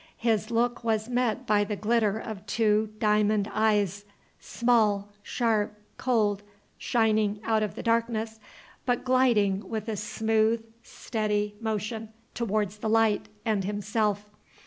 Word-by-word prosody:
His 225 -1 0
look 235 +1 0
was 220 0 0
met 245 -3 0
by 210 -1 +3
the 205 0 -3
glitter 215 0 +1
of 220 -3 -7
two 215 0 +2
diamond 210 -1 +2
eyes, 205 -2 +1 0.4
small, 215 -4 +1
sharp, 210 -2 -1 0.2
cold, 215 -5 +1 0.4
shining 215 -3 +1
out 220 -1 +1
of 215 - -2
the - - -6
darkness, 230 -1 0 0.5
but 245 0 0
gliding 215 -7 +2
with 220 -1 -4
a 220 - -2
smooth, 220 +2 0 0.2
steady 210 -3 -2
motion 220 0 -3 0.2
towards 210 -3 -1
the 220 - -2
light, 225 -1 +2 0.2
and 215 -4 +1
himself. 205 +1 -1
215 Hz, 125 wpm, -27 LUFS, 210-230 Hz, 0.5 s, by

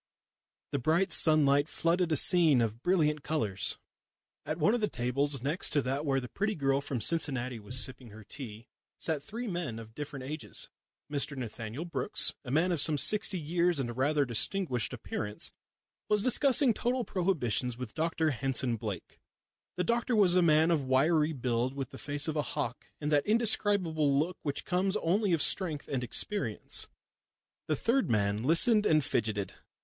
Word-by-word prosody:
The 140 - -1
bright 165 +8 +1
sunlight 150 -2 +4
flooded 170 +1 0
a - - +3
scene 160 -3 +5
of 115 0 -2
brilliant 155 -4 +1
colours. 110 -12 0 0.7
At 155 - -2
one 170 +7 +2
of 240 - -1
the 210 - 0
tables 130 +2 -1
next 150 +7 +1
to 145 - +2
that 140 +4 -3
where 135 -1 +1
the 125 - -7
pretty 210 - -2
girl 135 -2 0
from 135 -3 -4
Cincinnati 130 -4 0
was 110 +5 +1
sipping 130 -2 -2
her 110 +1 -13
tea 115 -2 -9 0.3
sat 160 -3 -1
three 230 +11 -7
men 175 - -4
of 110 -1 -11
different 145 -1 -7
ages. 150 +3 -5 0.4
Mr 140 0 -1
Nathaniel 120 +4 -6
Brookes, 170 - 0
a 130 - -9
man 160 +7 +1
of 165 -5 +1
some 155 -1 +4
sixty 185 +6 +2
years 170 +1 0
and 120 -3 -3
rather 145 +3 +1
distinguished 125 - +1
appearance, 110 -3 -3 0.6
was 210 -1 +2
discussing 260 0 +4
total 245 +2 -2
prohibitions 130 - -1
with 125 -3 -7
Dr 160 -1 -1
Henson 130 -2 0
Blake. 105 -4 -7 0.6
The 180 - -1
doctor 235 +2 0
was 190 -4 +4
a 180 - +4
man 160 0 +3
of 155 -4 +1
wiry 150 +4 +2
build, 125 -2 -2
with 135 -3 -5
the - - -10
face 145 +1 -2
of 160 - -3
a 150 - +1
hawk, 140 -5 -4
and 150 0 -3
that 145 -1 +2
indescribable 200 -10 +1
look 170 +5 -2
which 145 -2 -4
comes 190 +2 0
only 200 +3 0
of 165 -4 +2
strength 160 -5 +1
and 130 -3 -3
experience. 125 - 0 0.8
The 155 - 0
third 245 - 0
man 105 -1 0
listened 210 - +5
and 155 -3 +2
fidgeted. 105 -4 -2
150 Hz, 170 wpm, -30 LUFS, 125-175 Hz, 0.8 s, scene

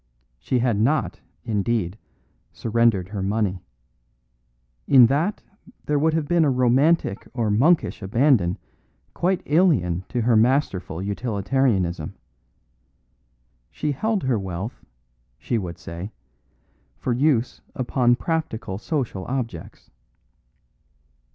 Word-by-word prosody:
She 130 - -1
had 120 -4 +1
not, 140 +8 +1 0.3
indeed, 105 -4 -1 0.6
surrendered 115 -5 +1
her 100 -2 -4
money; 100 -2 -1 1.3
in 130 -3 +8
that 155 - 0 0.4
there 150 -1 +1
would 160 +2 +2
have 155 -3 -1
been 170 0 +3
a 150 - +3
romantic 130 -1 +2
or 115 -4 0
monkish 145 +10 +2
abandon 105 -3 +2 0.6
quite 185 +1 0
alien 140 - +2
to 120 - -1
her 115 +1 +3
masterful 110 - +1
utilitarianism. 100 - -1 1.5
She 150 - -3
held 215 +7 -1
her 130 -4 +1
wealth, 95 +3 -6 0.5
she 115 - -2
would 85 -4 -6
say, 85 +5 -7 0.9
for 125 - -1
use 130 -2 +1
upon 125 -1 +2
practical 125 - -3
social 120 - -3
objects. 120 -10 -5
120 Hz, 105 wpm, -23 LUFS, 100-140 Hz, 1.5 s, in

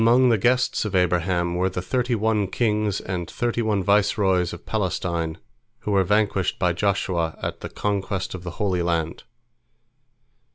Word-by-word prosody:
Among 120 +3 +5
the 115 -3 +3
guests 125 +4 +2
of 105 -3 -3
Abraham 90 -1 +1
were 90 +2 +1
the 90 - -4
thirty 125 +6 0
one 110 -2 +1
kings 105 -1 0
and 90 -3 -4
thirty 120 -1 -1
one 105 -4 0
viceroys 95 -2 +2
of 85 - -9
Palestine 85 -5 -2 0.4
who 105 - -3
were 100 -1 +4
vanquished 105 -1 +1
by 90 -1 +1
Joshua 85 -3 0
at - - -4
the - - -6
conquest 100 -2 -2
of 90 - -6
the 90 - -5
Holy 95 -4 0
Land. 85 -1 -1
95 Hz, 160 wpm, -24 LUFS, 90-105 Hz, 0.4 s, Among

